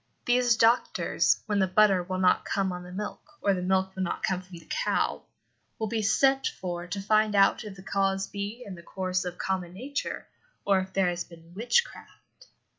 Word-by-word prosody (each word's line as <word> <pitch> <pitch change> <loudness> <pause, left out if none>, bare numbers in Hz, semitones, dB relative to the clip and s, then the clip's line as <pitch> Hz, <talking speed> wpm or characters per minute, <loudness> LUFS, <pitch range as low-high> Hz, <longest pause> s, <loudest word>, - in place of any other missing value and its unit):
These 245 -2 +3
doctors, 230 +2 +2
when 205 -2 0
the 190 - +3
butter 195 0 +4
will 185 +1 -4
not 185 -1 +3
come 195 -1 -1
on 180 0 -5
the 180 0 -10
milk, 205 +3 -5 0.2
or 200 - +2
the 185 - -2
milk 190 +1 0
will 190 - -3
not 185 - -2
come 185 -1 0
from 180 -1 -12
the 165 - -15
cow, - - 0 0.6
will 220 - -2
be 225 0 -1
sent 270 +6 +3
for 175 -1 -5
to 200 +3 -4
find 215 +1 +2
out 195 +3 +4
if 210 -2 -8
the 190 - -12
cause 195 0 0
be 205 +5 -6
in 200 - -7
the 170 - -10
course 185 +1 -2
of 180 0 -5
common 185 -2 -2
nature 270 +7 -4 0.4
or 195 -1 +4
if 190 0 -5
there 190 -1 +2
has 175 0 -2
been 165 0 -16
witchcraft. 365 - -2
195 Hz, 200 wpm, -28 LUFS, 185-215 Hz, 0.6 s, butter